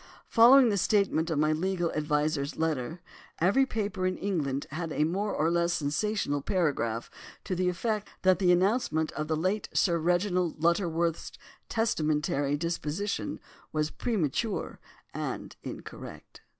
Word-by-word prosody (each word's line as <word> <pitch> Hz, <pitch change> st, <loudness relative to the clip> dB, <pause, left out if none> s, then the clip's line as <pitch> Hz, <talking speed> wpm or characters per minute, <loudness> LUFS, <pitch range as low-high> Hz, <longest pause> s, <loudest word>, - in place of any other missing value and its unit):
Following 245 Hz, +2 st, +7 dB
the 205 Hz, -, +1 dB
statement 190 Hz, -5 st, +2 dB
in 155 Hz, -3 st, 0 dB
my 155 Hz, +1 st, +3 dB
legal 175 Hz, +1 st, -1 dB
adviser's 150 Hz, -1 st, -1 dB
letter, 160 Hz, +1 st, -2 dB, 0.4 s
every 205 Hz, +11 st, +3 dB
paper 205 Hz, -5 st, -2 dB
in 185 Hz, -, -2 dB
England 145 Hz, -9 st, -1 dB
had 165 Hz, +2 st, -4 dB
a 150 Hz, -, +1 dB
more 195 Hz, +6 st, -1 dB
or 160 Hz, +2 st, +1 dB
less 170 Hz, 0 st, +2 dB
sensational 150 Hz, 0 st, -1 dB
paragraph 135 Hz, -, -1 dB, 0.3 s
to 195 Hz, -, -3 dB
the 180 Hz, 0 st, +1 dB
effect 210 Hz, +3 st, -2 dB, 0.2 s
that 185 Hz, 0 st, +4 dB
the 180 Hz, -2 st, +4 dB
announcement 180 Hz, -4 st, +2 dB
of 150 Hz, 0 st, -4 dB
the 160 Hz, -, 0 dB
late 190 Hz, +6 st, -1 dB
Sir 170 Hz, -3 st, +3 dB
Reginald 175 Hz, 0 st, +1 dB
Lutterworth's 170 Hz, -1 st, +1 dB, 0.4 s
testamentary 150 Hz, -9 st, 0 dB
disposition 170 Hz, +4 st, -3 dB, 0.3 s
was 155 Hz, 0 st, -1 dB
premature 215 Hz, -, -2 dB, 0.3 s
and -, -, -5 dB
incorrect. -, -, -9 dB
170 Hz, 135 wpm, -29 LUFS, 155-195 Hz, 0.4 s, Following